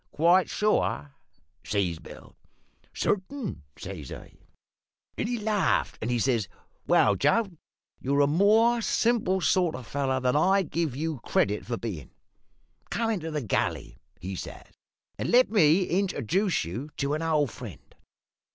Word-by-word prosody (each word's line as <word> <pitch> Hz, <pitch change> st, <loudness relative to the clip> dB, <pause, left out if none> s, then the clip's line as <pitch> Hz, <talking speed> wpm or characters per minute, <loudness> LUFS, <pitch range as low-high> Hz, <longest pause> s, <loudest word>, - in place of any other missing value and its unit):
"`Quite 175 Hz, +4 st, +4 dB
sure?' 75 Hz, -, 0 dB, 0.5 s
says 95 Hz, -6 st, -1 dB
Bill. -, -, -13 dB, 0.6 s
"`Certain,' 210 Hz, +4 st, -2 dB, 0.2 s
says 90 Hz, -8 st, -8 dB
I. -, -, -10 dB, 0.8 s
"Then -, -, -2 dB
he 240 Hz, 0 st, -1 dB
laughed, 215 Hz, -2 st, 0 dB
and 110 Hz, -, -2 dB
he 120 Hz, -, +1 dB
says, 115 Hz, -4 st, +1 dB, 0.4 s
`Well, -, -, +5 dB
Joe, 230 Hz, -1 st, +3 dB, 0.5 s
you're 140 Hz, +2 st, +1 dB
a -, -, +5 dB
more 215 Hz, +9 st, +4 dB
simple 220 Hz, -5 st, +1 dB
sort 175 Hz, -2 st, +2 dB
of 130 Hz, -, -6 dB
a -, -, -12 dB
feller 130 Hz, +1 st, -1 dB
than 125 Hz, 0 st, +1 dB
I 190 Hz, +6 st, +4 dB
give 160 Hz, -5 st, -2 dB
you 155 Hz, -1 st, -3 dB
credit 105 Hz, -2 st, 0 dB
for 120 Hz, -1 st, -2 dB
bein'. 95 Hz, -, -6 dB, 0.8 s
Come 230 Hz, -1 st, 0 dB
into 170 Hz, -7 st, -3 dB
the 150 Hz, -2 st, -2 dB
galley,' 110 Hz, -, -2 dB, 0.2 s
he 95 Hz, +2 st, -5 dB
says, -, -, -8 dB, 0.5 s
`and -, -, -1 dB
let 250 Hz, -1 st, +5 dB
me 180 Hz, -3 st, +4 dB
introjuce 190 Hz, -, 0 dB
you 115 Hz, -, -6 dB
to 140 Hz, +1 st, -1 dB
an 155 Hz, -, -1 dB
old 155 Hz, -6 st, +1 dB
friend.' -, -, -11 dB
155 Hz, 145 wpm, -27 LUFS, 120-200 Hz, 0.8 s, `Well